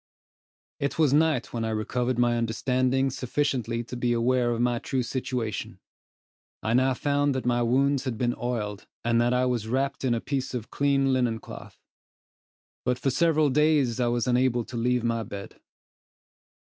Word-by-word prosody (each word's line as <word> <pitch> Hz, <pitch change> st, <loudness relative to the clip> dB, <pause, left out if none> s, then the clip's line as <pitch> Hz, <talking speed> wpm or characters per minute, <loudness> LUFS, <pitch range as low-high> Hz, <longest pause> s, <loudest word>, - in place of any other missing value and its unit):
It 140 Hz, -, -2 dB
was 155 Hz, -4 st, +3 dB
night 155 Hz, -4 st, +2 dB
when 115 Hz, -1 st, -2 dB
I 110 Hz, -, -1 dB
recovered 120 Hz, +3 st, -1 dB
my 120 Hz, -1 st, +3 dB
understanding 130 Hz, +4 st, +1 dB
sufficiently 125 Hz, -3 st, -1 dB
to 120 Hz, -, -8 dB
be 120 Hz, 0 st, 0 dB
aware 120 Hz, +1 st, +2 dB
of 120 Hz, -1 st, -1 dB
my 120 Hz, -1 st, +1 dB
true 130 Hz, +1 st, -2 dB
situation. 120 Hz, -4 st, -3 dB, 0.8 s
I 110 Hz, -, 0 dB
now 130 Hz, +1 st, +3 dB
found 145 Hz, 0 st, +1 dB
that 130 Hz, -, -3 dB
my 120 Hz, -1 st, +2 dB
wounds 135 Hz, +3 st, +2 dB
had 125 Hz, -4 st, -2 dB
been 120 Hz, 0 st, 0 dB
oiled, 105 Hz, -5 st, -4 dB, 0.2 s
and 115 Hz, 0 st, +3 dB
that 120 Hz, +1 st, +2 dB
I 125 Hz, 0 st, +2 dB
was 120 Hz, -4 st, -1 dB
wrapped 135 Hz, +4 st, -1 dB
in 125 Hz, -3 st, +2 dB
a -, -, -1 dB
piece 135 Hz, 0 st, -3 dB
of 115 Hz, -3 st, -5 dB
clean 140 Hz, -1 st, +2 dB
linen 125 Hz, -3 st, +1 dB
cloth; -, -, -11 dB, 1.1 s
but 125 Hz, 0 st, 0 dB
for 135 Hz, +2 st, 0 dB
several 155 Hz, 0 st, +3 dB
days 145 Hz, -4 st, +2 dB
I 120 Hz, -, +2 dB
was 120 Hz, -1 st, 0 dB
unable 125 Hz, -1 st, +2 dB
to 130 Hz, -, -9 dB
leave 125 Hz, +1 st, +1 dB
my 115 Hz, -1 st, 0 dB
bed. 100 Hz, -2 st, -8 dB
125 Hz, 170 wpm, -26 LUFS, 120-135 Hz, 1.1 s, was